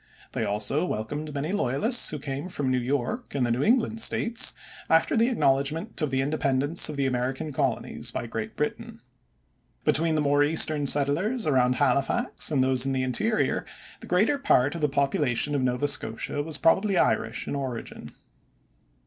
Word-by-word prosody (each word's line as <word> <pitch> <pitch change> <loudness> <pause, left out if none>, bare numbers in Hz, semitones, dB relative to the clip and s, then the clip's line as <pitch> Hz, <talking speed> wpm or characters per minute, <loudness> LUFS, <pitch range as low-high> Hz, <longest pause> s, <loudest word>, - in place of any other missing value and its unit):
They - - -3
also 105 +9 0
welcomed 145 +2 -4
many 145 +4 -3
loyalists 205 - +1
who 150 - -4
came 140 +4 -5
from 140 -7 -2
New 130 - +1
York 140 - -3
and 130 -3 +1
the 120 - -1
New 120 +3 0
England 225 - +1
States 230 0 +2 0.4
after 165 0 +3
the 230 +1 +3
acknowledgment 160 - 0
of 150 - 0
the 135 0 0
independence 140 +2 0
of 150 - -6
the 140 - 0
American 130 +3 -2
Colonies - - -2
by - - -5
Great - - -6
Britain. - - -4 0.9
Between 160 +1 +3
the - - +1
more 145 0 +2
eastern 150 -1 +3
settlers 165 - +2
around 125 -3 +2
Halifax 140 - 0
and 140 -4 +1
those 130 -1 +3
in 135 0 -1
the 130 -1 -1
interior, 215 - 0 0.4
the - - -11
greater 215 +11 +2
part 145 - +2
of 170 - -6
the 150 - +1
population 140 -1 0
of 140 - 0
Nova 125 +2 0
Scotia 145 0 -1
was 155 0 -3
probably 195 +5 +2
Irish - - 0
in - - -3
origin. 130 -4 -6
145 Hz, 170 wpm, -26 LUFS, 130-165 Hz, 0.9 s, after